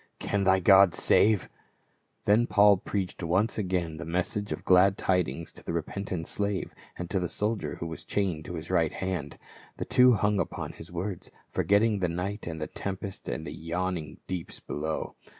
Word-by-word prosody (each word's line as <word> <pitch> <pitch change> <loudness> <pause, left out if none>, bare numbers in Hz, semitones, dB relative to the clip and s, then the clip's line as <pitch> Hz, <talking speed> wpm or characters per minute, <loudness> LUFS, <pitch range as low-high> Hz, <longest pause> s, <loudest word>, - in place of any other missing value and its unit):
Can 100 -1 -1
thy 95 0 +5
God 95 -1 +6
save 105 -2 +4 0.4
?" - - -42
Then 110 +4 +4
Paul 100 -1 +6
preached 95 -1 -3
once 95 +7 +1
again 90 -5 -1
the 80 - -6
message 90 +5 -2
of - - -1
the - - -17
glad 95 +1 +5
tidings 85 -4 0
to - - -13
the - - -4
repentant 85 +1 -3
slave 100 -2 -2 0.2
and 90 - -4
to 95 - +1
the 90 -2 -2
soldier 105 -9 -2
who - - -6
was 80 0 -6
chained 90 -7 -1
to 90 - -6
his 80 +2 -6
right 85 -4 +2
hand. 90 -7 -3 0.4
The - - -3
two 125 0 +6
hung 105 -2 +2
upon - - -3
his 80 - -12
words, 90 +2 -4 0.2
forgetting 105 +1 +3
the 90 -2 +1
night 95 +5 -4
and 80 -1 -4
the 75 - -2
tempest 95 +2 -6
and - - -4
the - - -6
yawning 85 -1 -3
deeps 90 -3 -5
below. 80 +1 -4
95 Hz, 185 wpm, -28 LUFS, 85-100 Hz, 0.4 s, God